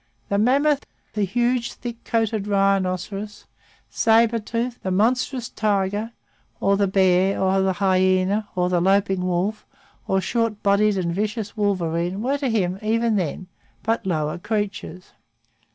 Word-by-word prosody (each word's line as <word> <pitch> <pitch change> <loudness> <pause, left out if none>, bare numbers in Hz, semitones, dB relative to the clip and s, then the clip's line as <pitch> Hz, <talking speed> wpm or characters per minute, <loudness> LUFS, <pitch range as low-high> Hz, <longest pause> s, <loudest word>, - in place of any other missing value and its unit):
The 200 - +1
mammoth, 275 +5 +2 0.3
the 210 -2 0
huge, 240 +4 0
thick 240 -1 -8
coated 220 -3 0
rhinoceros, 195 +1 -1 0.4
sabre 230 +1 +3
tooth, 235 +3 -3
the 190 - -3
monstrous 240 +5 +1
tiger, 205 +1 -1 0.5
or 200 0 +2
the 200 0 +2
bear, 190 0 +3
or 190 0 +2
the 190 0 +1
hyena, 185 +2 +2
or 180 -1 +1
the 180 -1 +1
loping 195 0 +2
wolf, 185 +4 -1 0.4
or 190 - +2
short 230 +1 -1
bodied 200 0 +3
and 170 -2 -1
vicious 210 +2 -3
wolverine 180 -3 -1
were 275 +3 0
to 275 -3 -1
him, 190 -4 0
even 225 +1 +1
then, 185 -1 -2 0.4
but 225 +1 0
lower 155 -2 -1
creatures. 205 -3 -4
200 Hz, 135 wpm, -23 LUFS, 185-225 Hz, 0.5 s, sabre